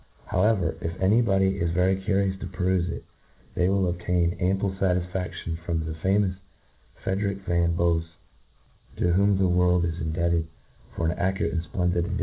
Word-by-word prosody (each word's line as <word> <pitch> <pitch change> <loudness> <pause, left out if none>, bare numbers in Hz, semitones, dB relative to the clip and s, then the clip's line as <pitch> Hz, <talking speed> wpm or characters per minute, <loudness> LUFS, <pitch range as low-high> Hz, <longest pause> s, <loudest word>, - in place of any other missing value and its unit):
How 90 - 0
ever, 100 -7 +2
if 85 +2 -4
any 100 +5 +4
body 95 -3 +2
is 85 - +1
very 90 +2 +3
curious 95 0 0
to 95 - -5
perufe 90 -1 0
it, - - -6 0.5
^ey 90 - +2
will 95 -1 +2
obtain 85 0 0
ample 95 +1 +1
fatisfadtion 90 -2 -2
from 80 -2 -2
the 80 - -4
fa 95 +5 +1
mous 95 -3 0 0.7
Frederick 100 0 -2
van 85 -1 +1
Bofs, 85 -1 +1 0.9
to 85 - +2
whom 100 +1 +3
the 95 -1 +3
world 90 -1 +3
is 85 +1 -3
indebted 85 0 0 0.5
for 85 - -1
an - - +2
accurate 95 +1 0
and 85 -1 -2
fplendid 90 -1 0
edition 85 - +1
of - - -1
the - - -4
90 Hz, 180 wpm, -26 LUFS, 85-95 Hz, 0.9 s, any